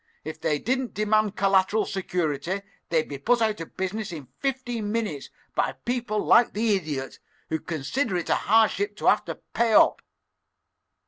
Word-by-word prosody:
If 155 - -7
they 150 - +1
didn't 260 - -2
demand 215 0 +2
collateral 195 +2 +3
security 180 0 -2 0.3
they'd 160 -2 +1
be 140 -2 -6
put 240 - +2
out 215 -4 0
of 165 - -10
business 195 +2 -3
in 145 -6 -8
fifteen 245 -6 -2
minutes 210 -11 -2 0.2
by 130 - 0
people 240 -4 -1
like 240 - +5
the 215 0 +2
Idiot, 150 -7 -4 0.3
who 160 - -1
consider 180 - -2
it 175 - -3
a - - +3 0.2
hardship 210 -2 +3
to - - -7
have - - +4
to - - -4
pay 230 -1 -1
up." - - +5
205 Hz, 160 wpm, -26 LUFS, 165-225 Hz, 0.3 s, like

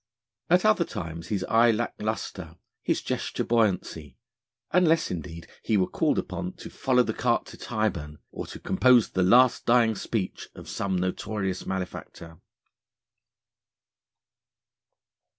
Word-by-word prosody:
At 180 +4 +4
other 215 -5 +4
times 85 - -6
his 100 0 -2
eye 115 +1 +4
lacked 115 +1 -1
lustre, 110 +1 -4 0.3
his - - -1
gesture - - -2
buoyancy, 90 - 0 0.5
unless 165 -2 +3
indeed 85 -1 -6 0.2
he 110 - +1
were 95 - +3
called 155 - 0
upon 180 +1 -3
to - - -11
follow 130 -2 +2
the 110 - -2
cart 120 0 0
to - - -11
Tyburn, 85 -10 -3
or - - -6
to - - -9
compose 120 +4 +4
the 95 - 0
Last 120 +7 +4
Dying 120 -2 +4
Speech 105 -2 -4
of - - -11
some 95 -1 -2
notorious 95 +1 -2
malefactor. 90 -3 -6
110 Hz, 130 wpm, -26 LUFS, 90-120 Hz, 0.5 s, At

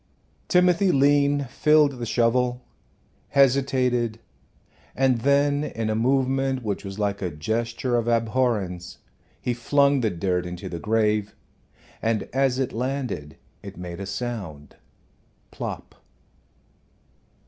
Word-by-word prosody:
Timothy 180 +1 +4
Lean 145 0 +3
filled 145 +1 +3
the 120 - -4
shovel, 125 +2 +1 0.7
hesitated, 125 -4 +2 0.8
and 130 -2 +2
then 140 +3 +2
in 115 -6 -3
a - - 0
movement 135 +2 +1
which 100 -3 -3
was 95 0 -7
like 100 -1 -1
a 90 - -1
gesture 115 - -2
of 115 -1 -1
abhorrence 115 -6 0 0.4
he 125 - -1
flung 140 +3 +2
the 115 -3 +1
dirt 90 -1 -1
into 90 0 -7
the 85 - -5
grave, 105 0 0 0.7
and 110 -2 0
as 135 -1 +2
it 130 -2 -1
landed 125 - -3 0.2
it - - -10
made 90 0 -7
a 100 - -5
sound 100 - -6 0.8
plop! - - -6
120 Hz, 115 wpm, -24 LUFS, 105-135 Hz, 0.8 s, Timothy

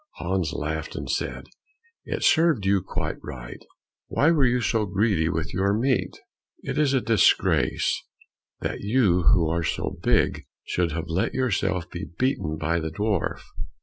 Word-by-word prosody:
Hans - - -1
laughed - - -4
and - - -5
said, - - -3 0.6
"It - - -3
served 160 - +3
you 95 -1 +3
quite - - -4
right; 60 -4 -8 0.4
why 150 +4 +3
were 145 -6 +4
you 125 0 +2
so 110 -3 0
greedy 95 -4 +1
with 80 -1 -3
your 100 +3 +1
meat? 130 +2 0 0.5
It - - -2
is 140 -3 +3
a 130 - +2
disgrace 115 -3 +2 0.6
that - - -3
you 100 -5 +3
who 80 +3 +4
are 85 +1 0
so 75 - -3
big - - +1 0.2
should 90 -2 -1
have 80 0 -3
let 85 +4 -1
yourselves 95 -8 0
be 90 +1 -7
beaten 100 - 0
by 85 +3 0
the 80 0 -3
dwarf." 100 +3 -1
95 Hz, 155 wpm, -25 LUFS, 85-125 Hz, 0.6 s, were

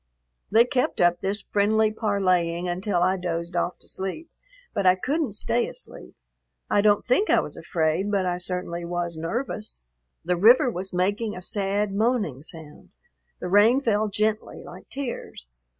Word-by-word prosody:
They 225 +3 +5
kept 250 0 -1
up 175 0 +3
this 200 +2 -2
friendly 215 +1 +2
parleying 185 -5 0
until 180 0 0
I 185 +1 +2
dozed 170 -1 -4
off 175 +1 -1
to - - -14
sleep, 195 - -5 0.4
but 200 - -1
I 185 - +6
couldn't 275 - -1
stay 235 +3 0
asleep. 60 - -10 0.6
I 205 - +4
don't 205 0 +3
think 325 - +2
I - - +5
was - - -5
afraid, 165 +3 -1
but 200 -2 +1
I 180 0 -1
certainly 180 -1 -3
was 175 0 -3
nervous. 215 +6 -4 0.5
The 180 0 +1
river 240 +6 +6
was 190 -1 -5
making 205 +5 -1
a 180 - -7
sad, 200 +1 -1
moaning 210 - 0
sound; 155 -1 -12 0.5
the - - -4
rain 210 +7 +5
fell 215 -5 +1
gently, 215 +1 -2
like - - -12
tears. 255 - -6
195 Hz, 160 wpm, -25 LUFS, 175-220 Hz, 0.6 s, I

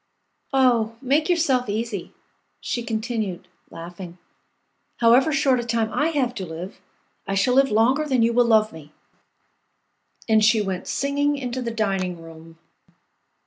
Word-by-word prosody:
"Oh, 240 -4 +2
make 280 +6 +1
yourself 270 -9 +1
easy," 210 -3 -4 0.5
she 240 - -3
continued, 220 -5 -4 0.2
laughing; 175 +1 -10 0.8
"however 240 +6 +4
short 270 -4 +2
a - - -2
time 230 -1 -1
I 300 - +1
have 275 -7 -1
to 190 - -4
live, 165 +4 -8 0.5
I 195 - -1
shall 195 +6 +2
live 270 +1 +4
longer 250 +8 +2
than 260 -5 +2
you 230 +1 +2
will 245 +1 +4
love 220 -3 +3
me!" 155 -2 -13 1.3
And 220 -1 +4
she 215 +1 +4
went 190 -3 -3
singing 285 +1 0
into 255 -1 -4
the 235 - -3
dining 195 -6 -2
room. 165 0 -13
230 Hz, 145 wpm, -23 LUFS, 195-260 Hz, 1.3 s, however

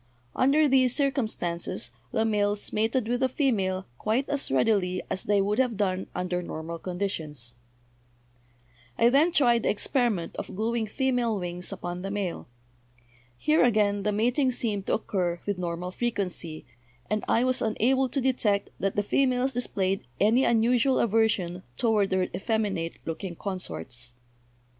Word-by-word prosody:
Under 290 +4 +4
these 255 -2 +4
cir 275 -1 +2
cumstances 175 - -2 0.2
the 220 - +1
males 205 -1 0
mated 225 +2 +1
with 245 +1 0
the 260 0 +2
female 195 -9 0
quite 230 +6 0
as 285 -1 0
readily 180 - +1
as 190 - -1
they 205 -1 +3
would 210 +4 0
have 250 -5 +1
done 190 -2 0
under 180 0 -1
normal 165 -1 -6
condi 185 +3 -2
tions. 150 -10 -3 1.4
"I 235 - +5
then 295 +7 +4
tried 240 -7 +4
the - - 0
experiment 215 -4 0
of - - -6
gluing 225 +2 -1
female 245 -2 0
wings 175 +1 -4
upon 175 -2 -5
the 195 - -4
male. 200 -4 -3 0.9
Here, 305 - +3
again, 210 -4 +3
the 210 +1 0
mating 245 +6 +2
seemed 210 -5 -2
to - - +3
occur 180 -5 -1
with 200 -3 -2
normal 175 +1 -3
frequency, 185 -8 -3 0.4
and 215 0 -1
I 230 - +3
was 255 0 +1
unable 255 +4 +2
to 275 - -1
detect 235 -6 +1
that 195 0 -1
the 205 - +1
females 255 +3 +1
displayed 195 - -1
any 225 +6 +4
unusual 240 +3 +3
aversion 210 -5 +1 0.2
toward 215 -4 +2
their 185 -1 +2
effeminate 205 -6 -1
looking 170 +2 -4
consorts. 120 - -5
210 Hz, 150 wpm, -27 LUFS, 185-245 Hz, 1.4 s, I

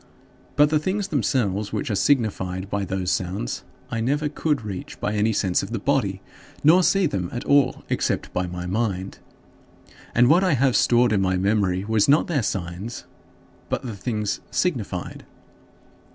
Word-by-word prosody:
But 150 0 +4
the 155 - +3
things 195 +5 -2
themselves 110 - 0
which - - -3
were - - 0
signified 95 -7 0
by 100 -1 -1
those 95 -1 -2
sounds 90 -7 -2 0.3
I 115 -1 -1
never 145 +5 0
could 150 -3 -1
reach 95 -3 -7
by 105 - -1
any 105 +1 +2
sense 95 -4 +1
of - - -6
the 115 - -2
body 100 -5 0 0.4
nor 165 +5 +6
see 195 +1 +3
them 95 - -2
at 120 - -4
all 140 -2 +3
except - - -1
by 90 0 -1
my 90 0 -6
mind. 95 -1 -2 1.0
And 120 +1 +5
what 175 +7 +5
I 185 -4 +3
have 130 0 +2
stored 120 -1 +4
in 100 - +2
my 95 -1 +1
memory 95 -1 +1
was 110 0 +2
not 145 +3 +5
their 155 -6 0
signs, 95 +2 -4 0.7
but - - -2
the 120 -5 -5
things 105 -1 -2
signified. 110 - -2
110 Hz, 165 wpm, -23 LUFS, 95-140 Hz, 1.0 s, nor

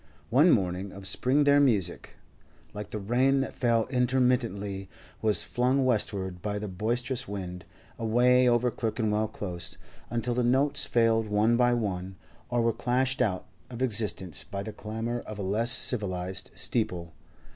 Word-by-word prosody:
One 145 +9 +6
morning 95 - +1
of 100 0 -10
spring 130 - +2
their 145 0 +5
music, 105 -11 0 0.6
like 105 -1 -7
the - - -4
rain 125 +6 +2
that 135 - -4
fell 115 -2 +1
intermittently, 120 -6 0 0.3
was 105 -1 +2
flung 130 +4 +1
westwards 100 -6 0
by 105 -1 -3
the 105 +1 -4
boisterous 120 +6 -2
wind, 90 -3 -6 0.3
away 125 +3 +4
over 120 +1 +2
Clerkenwell 110 -2 -1
Close, 90 -5 -4 0.3
until 120 +1 -1
the 125 +1 0
notes 140 +4 +2
failed 115 -1 +2
one 105 +3 +2
by 120 0 +3
one, 95 -4 -3 0.3
or 120 -1 +1
were 115 0 +2
clashed 130 +3 0
out 100 -7 0 0.2
of 125 +1 -4
existence 105 - 0
by 100 0 -5
the 110 +1 -7
clamour 115 +3 -4
of 110 - -7
a 100 - -4
less 105 +5 0
civilised 95 -7 0
steeple. 90 -7 -2
115 Hz, 150 wpm, -28 LUFS, 100-125 Hz, 0.6 s, One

